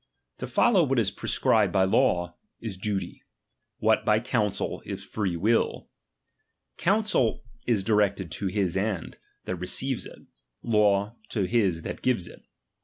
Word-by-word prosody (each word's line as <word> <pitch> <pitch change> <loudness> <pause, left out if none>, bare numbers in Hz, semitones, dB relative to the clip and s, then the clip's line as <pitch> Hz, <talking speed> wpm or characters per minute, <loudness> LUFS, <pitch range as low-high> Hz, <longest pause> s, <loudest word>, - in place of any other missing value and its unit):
To - - -4
follow 205 -8 +4
what 135 -3 0
is 105 -5 +2
prescribed - - +1
by 95 -1 +3
law, 90 -2 +2 0.2
is 110 -4 -5
duty; 95 +1 -4 0.6
what - - +2
by 105 0 +3
counsel, 115 -4 -1
is - - -6
free 95 -5 -2
will. 110 +7 +1 0.9
Counsel 200 - +1 0.2
is 110 -5 +2
directed 100 -4 +1
to 100 - -3
his 95 -2 -1
end, 95 -3 -2 0.3
that 90 - -3
re 90 +1 -5
ceives 130 +3 0
it; - - -14 0.4
law, 105 -1 +2
to 105 - -1
his 95 -5 +1
that - - -6
gives 115 -9 0
it. - - -13
105 Hz, 145 wpm, -27 LUFS, 95-115 Hz, 0.9 s, follow